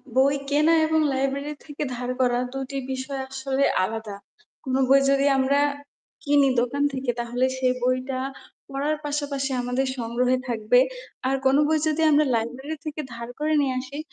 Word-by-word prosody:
বই 275 +2 +4
কেনা 305 +3 +4
এবং 315 0 +2
লাইব্রেরি 275 +2 -1
থেকে 295 -1 -5
ধার 245 +1 -4
করা 245 -1 +2
দুটি 270 0 -4
বিষয় 265 +1 -4
আসলে 270 0 0 0.2
আলাদা। 220 +1 -4 0.5
কোনো 260 -1 0
বই 275 - +7
যদি 275 0 +3
আমরা 270 +2 +2 0.6
কিনি 285 -1 +4
দোকান 280 +4 -1
থেকে 260 -2 -1
তাহলে 240 +2 0
সেই 255 -1 +2
বইটা 255 +1 0 0.5
পড়ার 280 +3 -1
পাশাপাশি 285 -2 -2
আমাদের 250 +2 -1
সংগ্রহে 245 +2 +1
থাকবে, 235 +1 +3 0.5
আর 270 - +2
কোনো 265 +2 +5
বই 315 0 +2
যদি 315 +1 0
আমরা 300 +1 +4
লাইব্রেরি 250 +7 -3
থেকে 305 0 -4
ধার 235 +1 -7
করে 305 +1 +1
নিয়ে 270 -2 0
আসি 270 +3 -7
270 Hz, 155 wpm, -24 LUFS, 250-285 Hz, 0.6 s, বই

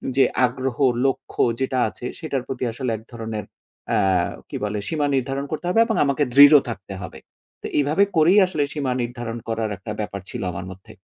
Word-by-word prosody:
যে 135 - +6 0.2
আগ্রহ, 130 0 -3 0.3
লক্ষ্য 135 - -1 0.2
যেটা 130 -1 0
আছে 120 - -10
সেটার 140 -6 -3
প্রতি 130 -1 -4
আসলে 125 +1 -3
এক 110 - -14
ধরনের 110 -2 -5 0.5
আ - - +3 0.5
কি - - -7
বলে? 105 0 -2
সীমা 150 -2 0
নির্ধারণ 135 +2 -1
করতে 155 +3 -4
হবে 185 - +2
এবং 225 -1 -1
আমাকে 140 +1 +1
দৃঢ় 145 +2 +9
থাকতে 95 -3 -7
হবে। - - -8 0.4
তো - - -4
এইভাবে 150 +7 +3
করেই 175 +6 +6
আসলে 155 -5 -1
সীমা 140 -4 -1
নির্ধারণ 120 -1 -4
করার 115 -1 -1
একটা 105 +3 -7
ব্যাপার 100 -2 -4
ছিল 125 - -5
আমার 90 - -6
মধ্যে। 95 +1 -13
130 Hz, 185 wpm, -22 LUFS, 115-145 Hz, 0.5 s, দৃঢ়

